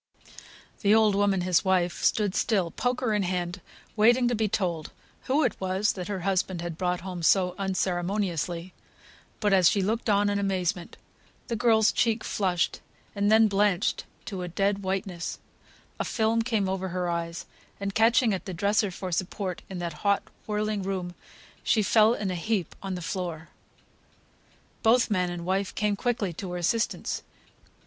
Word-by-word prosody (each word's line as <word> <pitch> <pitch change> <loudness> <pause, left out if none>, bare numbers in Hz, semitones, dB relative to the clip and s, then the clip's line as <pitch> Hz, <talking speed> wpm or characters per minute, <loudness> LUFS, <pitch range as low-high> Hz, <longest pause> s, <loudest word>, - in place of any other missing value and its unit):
The 205 +1 +5
old 220 -2 +4
woman, 200 -1 +2
his 180 -1 +2
wife, 180 -2 +1
stood 205 -4 +2
still, 195 -8 +1
poker 245 0 -1
in 210 - +1
hand, 180 0 -2 0.3
waiting 240 +3 +4
to - - 0
be 220 -1 +1
told 175 -6 -2 0.3
who 285 +4 +2
it - - +1
was 190 +3 +1
that 180 -2 -6
her 195 -3 -3
husband 185 -1 0
had 170 -1 -4
brought 180 +1 -1
home 180 -1 -6
so 180 +2 +3
unceremoniously; 180 -2 -1 0.7
but, 205 -2 +2
as 185 -3 +6
she 200 - +1
looked 225 +3 -1
in 205 0 +3
amazement 190 -3 -1 0.5
the 235 - 0
girl's 225 -2 +4
cheek 225 -1 +1
flushed, 180 -5 0 0.3
and 205 0 +1
then 220 0 +6
blanched 200 -1 +1 0.2
to 190 -3 -5
a 180 - -4
dead 195 +3 0
whiteness; 190 -2 -3 0.6
a - - +1
film 225 0 +1
came 225 -4 0
over 190 0 -2
her 180 0 -2
eyes, 170 0 -3 0.3
and 200 0 -3
catching 225 +1 +4
at 190 - -4
the 185 - -5
dresser 205 +3 +2
for 185 0 -6
support 185 +1 -3
in 190 - -6
that 170 -2 -3
hot 200 -1 +2 0.2
whirling 210 -1 -1
room, 185 -2 -3 0.5
she 215 - +3
fell 220 +3 +5
in 200 -4 -2
a - - -2
heap 185 -1 -1
on 195 -1 -4
the 180 - -6
floor. 165 -3 -4 1.3
Both 230 0 +4
man 180 -3 +1
and 175 -1 -5
wife 190 +1 -1
came 210 -1 +1
quickly 210 -4 -1
to 180 +2 -6
her - - -2
assistance. 225 +7 -1
195 Hz, 165 wpm, -27 LUFS, 180-210 Hz, 1.3 s, as